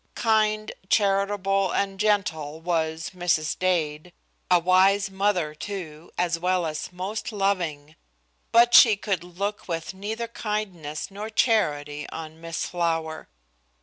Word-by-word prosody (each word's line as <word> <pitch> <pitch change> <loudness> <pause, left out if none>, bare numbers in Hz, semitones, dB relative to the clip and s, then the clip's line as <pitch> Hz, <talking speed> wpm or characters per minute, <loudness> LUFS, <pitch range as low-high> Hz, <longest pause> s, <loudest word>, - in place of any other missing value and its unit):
Kind, 215 -1 +1 0.2
charitable 195 -2 +2
and 195 -1 -1
gentle 165 -8 0
was 165 +1 -1
Mrs. 175 -4 0
Dade, 170 -3 0 0.4
a 180 - +6
wise 190 +3 +3
mother, 190 -5 0
too, 165 -2 -7
as 175 -1 0
well 180 0 +1
as 155 +1 -4
most 190 +6 -4
loving, 175 -7 -1 0.6
but 240 +1 +5
she 220 -4 +8
could 195 -4 -2
look 200 +4 -4
with 165 0 -4
neither 220 +4 -4
kindness 200 -9 -4
nor 210 +2 -6
charity 150 - +1
on 160 0 -8
Miss 165 -1 -3
Flower. 165 - -2
185 Hz, 120 wpm, -25 LUFS, 160-205 Hz, 0.6 s, she